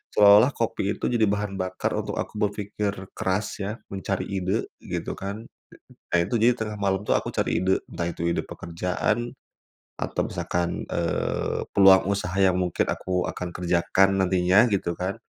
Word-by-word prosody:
seolah-olah, 105 +5 +7
kopi 110 -5 -1
itu - - -1
jadi 120 -2 +1
bahan 100 -1 -1
bakar, 95 0 -2
untuk - - -3
aku - - -4
berpikir 105 0 -1 0.2
keras, 95 +3 0 0.2
ya, 105 +4 -4
mencari 95 0 -3
ide, 95 +2 -1 0.2
gitu - - -4
kan. 100 +4 -6 0.7
Nah, 85 - +4
itu, 95 +7 0
jadi 115 +2 +5
tengah 105 -1 -3
malam 95 -1 +1
itu, - - +3
aku - - -3
cari - - 0
ide, 95 +1 +2
entah 85 0 -4
itu 85 0 -2
ide 85 - -1
pekerjaan, 90 +7 -2 0.7
atau - - -1
misalkan, 85 0 -2
eee, 85 -1 -1
peluang 95 -1 +7
usaha, 100 -2 -2
yang 95 -2 +4
mungkin 90 -2 0
aku 90 -1 -2
akan 90 -1 -4
kerjakan, 90 +2 +2
nantinya, 95 +5 +4
gitu 90 -3 0
kan. 95 +5 -3
95 Hz, 160 wpm, -25 LUFS, 90-105 Hz, 0.7 s, seolah-olah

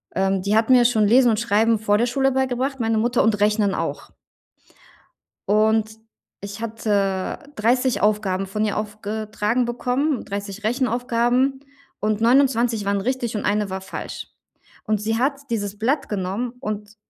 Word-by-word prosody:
ähm, 190 0 +1
die 200 +3 0
hatten 230 +3 +4
mir 245 -1 +6
schon 220 -3 +3
Lesen 245 +3 +5
und 215 - 0
Schreiben 225 0 +2
vor 205 -1 +2
der 235 - +2
Schule 270 +2 +1
beigebracht, 265 +1 -1
meine 225 -1 +1
Mutter 235 +2 +2
und 210 -2 +2
Rechnen 210 -1 +2
auch. - - -4 1.4
Und 220 +1 +2 0.4
ich 200 +2 -7
hatte 205 -4 -1 0.2
30 245 +3 +1
Aufgaben 200 -2 +1
von 210 +3 -1
ihr 205 - -2
aufgetragen 215 +2 -2
bekommen. 250 +4 -1
30 200 +1 -6
Rechenaufgaben 245 +2 +1 0.4
und 215 0 0
29 235 -3 +3
waren 200 0 0
richtig 240 +1 -2
und 210 - -2
1 205 -1 0
war 190 0 -4
falsch. 190 - -7 0.6
Und 215 -1 0
sie 220 +1 -1
hat 275 +3 0
dieses 205 -3 -3
Blatt 275 +6 0
genommen 205 +5 -2
und 210 -2 -5
220 Hz, 150 wpm, -22 LUFS, 205-245 Hz, 1.4 s, mir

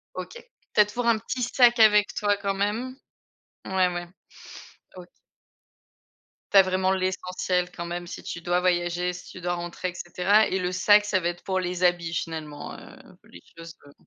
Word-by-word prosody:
OK, - - -6 0.4
tu 210 - +7
as - - +5
toujours 235 +3 -4
un 230 -1 +4
petit 250 +3 -5
sac 240 -1 +4
avec 210 -1 +5
toi 205 -1 +1
quand 200 -1 -2
même? 220 +6 -2 0.7
Ouais, 190 -1 +2
ouais. 175 0 -5 0.9
OK. 180 -1 -10 1.4
Tu 200 - +5
as - - +11
vraiment 185 0 0
l'essentiel 185 -1 -1
quand 170 -1 -6
même 175 0 -5
si - - -8
tu 170 - -6
dois 175 +1 +1
voyager, 175 0 0
si 180 - -11
tu 185 - -11
dois 175 0 -1
rentrer 175 +1 -5
et 180 - -9
cetera 180 +5 +2
et 190 - -1
le 180 0 -2
sac, 205 +3 +5
ça 205 -2 +1
va 175 -1 -1
être 175 0 -8
pour 190 -1 -1
les 180 0 -3
habits 175 -2 +1
finalement, 155 -2 -5
heu, - - -14 0.2
pour - - -23
les 85 - -13 0.2
choses 165 -1 -10
comme 145 0 -18
185 Hz, 190 wpm, -25 LUFS, 175-205 Hz, 1.4 s, as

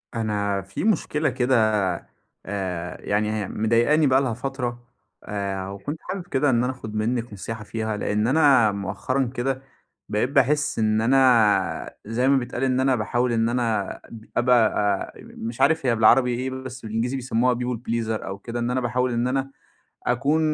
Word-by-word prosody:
أنا 105 -3 -1
في 95 +1 -6
مشكلة 160 -7 +1
كده 130 0 +1 0.9
آآ 95 -3 -4
يعني 105 +1 0
هي 105 -3 -2
مضايقاني 120 +8 +2
بقى 130 0 +4
لها 130 -4 -1
فترة 125 -1 -4 0.4
آآ 100 -2 -3
وكنت 100 +11 -5
حابب 185 -2 -6
كده 140 +1 +1
إن 120 -2 +2
أنا 125 - 0
آخُد 110 -4 -8
منِّك 115 +1 -1
نصيحة 110 +2 -6
فيها. 110 0 -3
لإن 105 +2 0
أنا 135 -6 +5
مؤخرًا 105 +7 -2
كده 130 +1 -1 0.5
بقيت 105 +4 0
باحس 140 0 +2
إن 110 0 +2
أنا 110 -8 +3
زي 115 +4 0
ما 140 0 +5
بيتقال 125 0 -3
إن 130 -1 +2
أنا 130 0 +3
باحاول 120 +2 0
إن 115 0 +2
أنا 115 -5 0
أب 110 -1 -12
أبقى 120 -2 +4 0.4
أ - - -17
مش 115 +1 -7
عارف 160 -4 +3
هي 120 - +3
بالعربي 120 +3 +5
إيه، 130 +2 -2
بس 130 -1 -7
بالإنجليزي 115 +4 -1
بيسمُّوها 125 -1 +1
people 125 0 -2
pleaser 115 -2 -2
أو 95 - -5
كده. 115 +4 -6
إن 120 +1 -1
أنا 130 +1 0
باحاول 125 +1 0
إن 120 +1 0
أنا 135 +1 -1 0.6
أكون 140 +6 +2
120 Hz, 170 wpm, -24 LUFS, 110-130 Hz, 0.9 s, أنا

